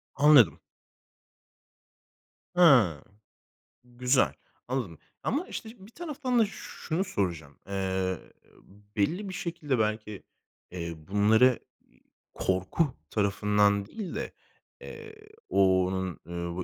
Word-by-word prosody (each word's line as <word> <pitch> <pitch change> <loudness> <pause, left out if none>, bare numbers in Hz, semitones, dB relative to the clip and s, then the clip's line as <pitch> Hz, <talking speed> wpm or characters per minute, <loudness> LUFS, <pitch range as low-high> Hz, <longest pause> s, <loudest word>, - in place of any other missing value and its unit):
Anladım. 150 +1 +6 2.0
Hıı. 130 - +6 0.8
Güzel, 125 +2 +1 0.3
anladım. 120 - -3 0.3
Ama 300 +9 -1
işte 220 - -6
bir 195 +4 -14
taraftan 285 -6 -2
da 225 - +5
şunu 190 -3 -4
soracağım. 85 - -3
Eee, 95 -1 -1 0.8
belli 175 - 0
bir - - -6
şekilde 150 -8 -2
belki, 105 -1 -2 0.5
eee, 85 -2 -4
bunları 110 +5 +4 0.3
i - - -28 0.3
korku 95 - 0 0.2
tarafından 105 0 +2
değil 195 - -7
de, - - -4 0.5
eee, 445 -1 -10 0.3
o 95 -1 +4
onun, 95 -2 -3
ııı, 85 +1 -4
110 Hz, 95 wpm, -28 LUFS, -, 2.0 s, Anladım